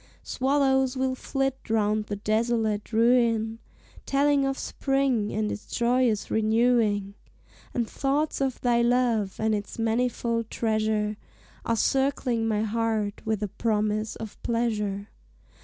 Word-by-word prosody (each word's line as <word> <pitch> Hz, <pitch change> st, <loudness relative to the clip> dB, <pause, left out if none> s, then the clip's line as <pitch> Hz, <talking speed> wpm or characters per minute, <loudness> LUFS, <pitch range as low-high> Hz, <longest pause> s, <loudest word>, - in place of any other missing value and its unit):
Swallows 265 Hz, -1 st, +1 dB
will 260 Hz, 0 st, 0 dB
flit 270 Hz, 0 st, -2 dB
round 215 Hz, -1 st, +1 dB
the 205 Hz, -, -4 dB
desolate 215 Hz, 0 st, 0 dB
ruin, 230 Hz, -1 st, +2 dB, 0.5 s
Telling 280 Hz, 0 st, +3 dB
of 270 Hz, 0 st, -2 dB
spring 270 Hz, -6 st, 0 dB
and 215 Hz, 0 st, -1 dB
its 205 Hz, -, -7 dB
joyous 240 Hz, -2 st, +1 dB
renewing; 220 Hz, -2 st, +2 dB, 0.6 s
And 235 Hz, -2 st, 0 dB
thoughts 280 Hz, +4 st, -1 dB
of 265 Hz, -2 st, -1 dB
thy 240 Hz, -1 st, +3 dB
love, 235 Hz, -5 st, +1 dB
and 220 Hz, 0 st, +1 dB
its 205 Hz, -1 st, -4 dB
manifold 230 Hz, 0 st, 0 dB
treasure, 215 Hz, -1 st, 0 dB, 0.5 s
Are 230 Hz, -, +1 dB
circling 260 Hz, -2 st, +1 dB
my 215 Hz, -1 st, +1 dB
heart 220 Hz, -1 st, -1 dB
with 220 Hz, -1 st, -1 dB
a -, -, 0 dB
promise 215 Hz, +1 st, -1 dB
of 220 Hz, -2 st, -9 dB
pleasure. 210 Hz, -4 st, -1 dB
230 Hz, 125 wpm, -26 LUFS, 215-255 Hz, 0.6 s, Telling